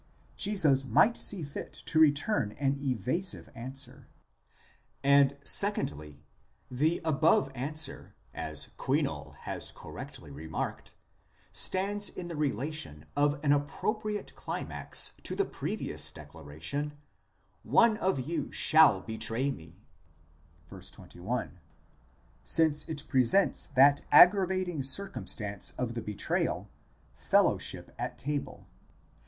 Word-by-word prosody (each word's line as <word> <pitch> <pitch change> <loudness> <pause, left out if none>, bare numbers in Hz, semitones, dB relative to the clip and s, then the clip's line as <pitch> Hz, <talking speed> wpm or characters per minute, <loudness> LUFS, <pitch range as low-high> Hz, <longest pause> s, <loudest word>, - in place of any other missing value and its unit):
Jesus 160 -10 +4
might 215 - +4
see 190 -5 -1
fit 140 -1 -7
to 160 - +1
return 145 - +3
an 140 +2 -1
evasive 135 - -1
answer; 130 +1 -8 1.0
and 140 0 +5
secondly, 75 - -2 0.5
the 155 +7 +1
above 135 -3 +3
answer, 140 +3 -5 0.2
as - - -5
Kuino] - - -1
has - - -3
correctly 70 - -9
remarked, 80 +3 -5 0.6
stands 200 +2 +4
in 175 -1 -7
the 170 - -5
relation 140 - -3
of 145 0 +2
an 145 - +3
appropriate 210 +9 -1
climax - - -4
to - - -4
the - - +1
previous - - -3
declaration: 80 - -6 0.7
one 230 -2 +4
of 190 -8 0
you 150 +2 -3
shall 155 -11 +5
betray 115 +5 -2
me 80 -7 -12 0.9
(vy. - - -9
21), - - -5 0.8
since 155 -2 +2
it 150 -2 -5
presents 130 +9 +2
that 140 0 +5
aggravating 185 -1 +5
circumstance 120 - -2
of 125 -2 -2
the 115 - -4
betrayal, 105 -1 -2 0.4
fellowship - - +1
at - - -4
table. 145 +1 -4
140 Hz, 105 wpm, -30 LUFS, 120-165 Hz, 1.0 s, and